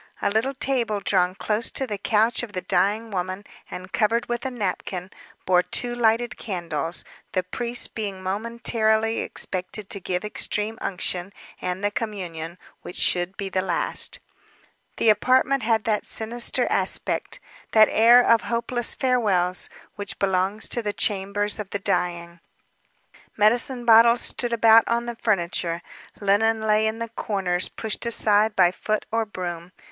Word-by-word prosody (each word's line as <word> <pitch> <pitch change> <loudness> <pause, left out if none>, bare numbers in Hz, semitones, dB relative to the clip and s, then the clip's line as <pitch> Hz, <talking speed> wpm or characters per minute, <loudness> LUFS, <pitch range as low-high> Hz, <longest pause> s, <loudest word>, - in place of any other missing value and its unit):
A - - 0
little 240 +6 0
table 240 -6 0
drawn 185 -2 +1
close 215 +3 -1
to 265 - -1
the 210 -5 -5
couch 220 +3 +2
of 240 -4 -8
the 185 - -4
dying 205 +5 0
woman, 185 +1 -4 0.2
and 185 +1 -8
covered 230 +1 +1
with 240 +2 -3
a - - -2
napkin, 190 -5 -4 0.3
bore 180 -1 +4
two 240 +6 0
lighted 230 -1 +1
candles, 170 -5 -4 0.3
the 185 - +1
priest 240 +6 -3
being 200 -4 -4
momentarily 220 +2 0
expected 185 +2 -4
to 200 - -1
give 180 +1 -3
extreme 210 +1 -3
unction 180 0 -3 0.3
and 180 +2 -3
the 205 - +1
communion, 180 -7 -5 0.2
which 180 - -9
should 180 +2 +1
be 200 - -3
the 190 -1 -1
last. 180 -2 -2 0.8
The 225 - +3
apartment 255 +5 +3
had 220 -1 +1
that 215 -2 -1
sinister 235 +2 0
aspect, - - +1 0.3
that 220 -1 +7
air 240 +3 +6
of 230 - +5
hopeless 235 +1 -1
farewells, 200 -9 +2 0.3
which 205 0 -5
belongs 195 +2 0
to 240 - -2
the 205 -2 -3
chambers 205 +1 0
of 205 -2 -5
the 200 - -2
dying. 175 -3 -2 1.0
Medicine 240 +4 +3
bottles 235 +1 +6
stood 240 -1 -2
about 225 -1 +5
on 235 +1 0
the 240 0 -5
furniture, 175 -6 -1 0.4
linen 220 +3 +2
lay 215 0 +2
in 220 +1 -2
the 230 0 -5
corners, 190 -5 -2
pushed 220 -1 -4
aside 215 -1 +3
by 180 -2 +5
foot 215 +3 -2
or 225 0 0
broom. 175 -3 -6
210 Hz, 150 wpm, -24 LUFS, 185-230 Hz, 1.0 s, that